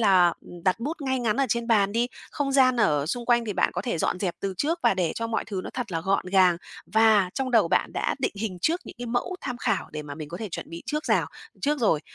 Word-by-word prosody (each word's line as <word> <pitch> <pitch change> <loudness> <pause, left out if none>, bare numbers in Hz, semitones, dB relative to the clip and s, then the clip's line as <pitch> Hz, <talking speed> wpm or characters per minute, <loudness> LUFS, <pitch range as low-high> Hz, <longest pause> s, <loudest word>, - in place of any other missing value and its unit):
là, 190 -5 +6
ừm, 175 -1 -12
đặt 185 +4 +2
bút 300 +7 -3
ngay 260 -1 0
ngắn 230 -2 0
ở 275 - +2
trên 235 0 0
bàn 205 -4 +3
đi, 235 +2 +2 0.2
không 280 -2 -2
gian 255 -2 +5
ở 145 -4 +2
xung 240 +7 -3
quanh 240 -1 +3
thì 215 - -2
bạn - - +2
có - - -3
thể 235 -10 -2
dọn 180 - 0
dẹp 180 -4 -1
từ 195 -1 -2
trước 325 - 0
và - - +4
để 180 -3 0
cho 230 - -2
mọi 225 -1 -1
thứ 200 -3 -4
nó - - -5
thật 235 -7 -4
là 165 - -1
gọn 190 +2 0
gàng, 185 -2 +4 0.3
và 220 -4 +4
trong 265 -1 -2
đầu 220 -8 +4
bạn - - +1
đã - - -1
định 265 - -1
hình 200 -5 -3
trước 340 +3 +2
những - - -10
cái 245 - -5
mẫu 245 +10 -2
tham 250 -3 -4
khảo - - -1
để 155 - -4
mà 145 -1 -7
mình 155 0 -7
có 170 - -6
thể 215 +1 -5
chuẩn 170 - -6
bị 170 0 -7
trước 300 +1 -2
rào - - +2 0.3
trước 295 +1 +1
rồi. 165 -9 +3
220 Hz, 280 wpm, -26 LUFS, 180-250 Hz, 0.3 s, là